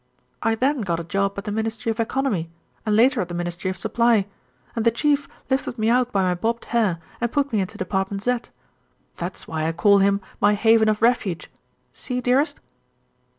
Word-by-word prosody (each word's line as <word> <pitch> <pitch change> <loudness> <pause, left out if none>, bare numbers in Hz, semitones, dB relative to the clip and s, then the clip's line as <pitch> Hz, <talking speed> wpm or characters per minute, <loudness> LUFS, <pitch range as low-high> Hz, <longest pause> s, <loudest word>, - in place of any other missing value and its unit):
"I 225 0 +2
then 265 +3 +1
got 170 -5 -1
a - - -4
job 195 +3 -1
at 200 - -4
the 210 - -4
Ministry 225 +1 -2
of 225 - -6
Economy 230 -8 -1 0.4
and 210 - +3
later 245 +3 +4
at 180 - -3
the 175 - -6
Ministry 175 +2 -3
of 185 - -4
Supply, 230 +1 +2 0.5
and 225 - 0
the 230 - +5
Chief 285 +4 +1 0.2
lifted 265 -2 -1
me 220 +1 +2
out 250 0 +2
by 195 -1 +2
my 180 -1 +2
bobbed 230 +6 -2
hair 215 -7 +2 0.2
and 235 -1 0
put 280 -3 0
me 210 - +2
into 185 - -5
Department 195 +1 -2
Z. 245 +1 +1 0.8
That's 175 +2 -5
why 160 -1 -2
I - - +1
call 200 +4 +5
him 200 0 +3 0.2
my 205 +1 +4
haven 220 +1 +4
of 215 +1 0
refuge. 220 -8 +1 0.4
See, 250 -1 -4
dearest?" 255 +5 +1
220 Hz, 195 wpm, -23 LUFS, 190-240 Hz, 0.8 s, the